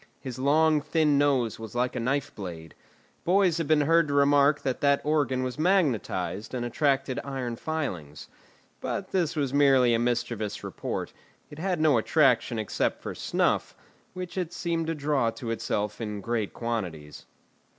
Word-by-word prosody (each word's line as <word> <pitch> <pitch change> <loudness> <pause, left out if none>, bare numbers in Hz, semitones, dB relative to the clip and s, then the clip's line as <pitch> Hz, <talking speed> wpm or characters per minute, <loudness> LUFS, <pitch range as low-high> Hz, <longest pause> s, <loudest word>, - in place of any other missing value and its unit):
His 130 -2 -7
long, 155 +3 +3
thin 155 -2 +2
nose 130 -7 +1
was 110 +1 -8
like 125 +1 0
a - - -1
knife 135 +4 -1
blade. 85 -6 -8 0.5
Boys 180 -2 +3
have 165 - -1
been 155 -1 +4
heard 165 +2 +4
to 140 - -1
remark 145 +1 +4
that 130 -2 -2
that 140 -1 +4
organ 145 -4 +1
was 130 +3 -4
magnetised 130 - 0
and 120 -1 -2
attracted 135 +1 0
iron 130 -4 -4
filings. 105 - -4 0.5
But 190 - -4
this 175 -5 0
was 140 -3 -1
merely 135 -4 +5
a 115 - +2
mischievous 120 -3 -2
report; - - -4 0.4
it 150 - -10
had 180 -1 -1
no 150 -6 +4
attraction 135 -2 +2
except 110 -2 -1
for - - -4
snuff, - - 0 0.4
which 185 0 -5
it 175 -2 -3
seemed 165 -1 -2
to 165 - -1
draw 145 -5 +1
to 115 0 -5
itself 105 -1 -2
in 105 -2 -4
great 115 -1 -2
quantities. 90 -11 -5
135 Hz, 160 wpm, -27 LUFS, 115-155 Hz, 0.5 s, merely